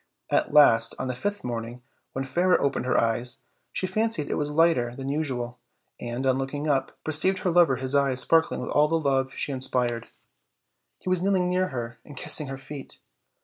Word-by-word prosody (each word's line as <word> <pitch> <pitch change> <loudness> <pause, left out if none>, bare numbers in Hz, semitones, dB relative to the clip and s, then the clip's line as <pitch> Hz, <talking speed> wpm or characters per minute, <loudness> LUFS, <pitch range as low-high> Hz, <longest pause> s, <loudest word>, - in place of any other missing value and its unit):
At - - +1
last, 115 -6 +5
on 130 - -3
the 125 - -2
fifth 205 +9 -3
morning, 120 0 -5 0.3
when 135 - -2
Fairer 180 +6 +2
opened 140 -2 -1
her - - +2
eyes 115 +1 -1 0.3
she - - -2
fancied 215 -6 -1
it - - +1
was 145 0 -1
lighter 150 -6 +2
than 135 +1 -5
usual, 125 -5 -3 0.4
and, 120 +2 -4
on 130 0 +2
looking 145 +3 -3
up, 140 -3 0
perceived 160 +5 +3
her 180 - +1
lover 165 -6 +5
his 130 +1 -2
eyes 140 -2 +2
sparkling 165 +3 +2
with - - -5
all 150 +1 +4
the 165 - 0
love 135 -3 0
she - - -2
inspired: 125 -3 -1 0.9
he - - -15
was 185 -1 +1
kneeling 185 -2 +2
near 185 +1 +1
her 120 -4 -6
and 145 - -13
kissing 150 +2 +1
her 135 0 -5
feet. 135 +1 -9
135 Hz, 190 wpm, -26 LUFS, 125-160 Hz, 0.9 s, last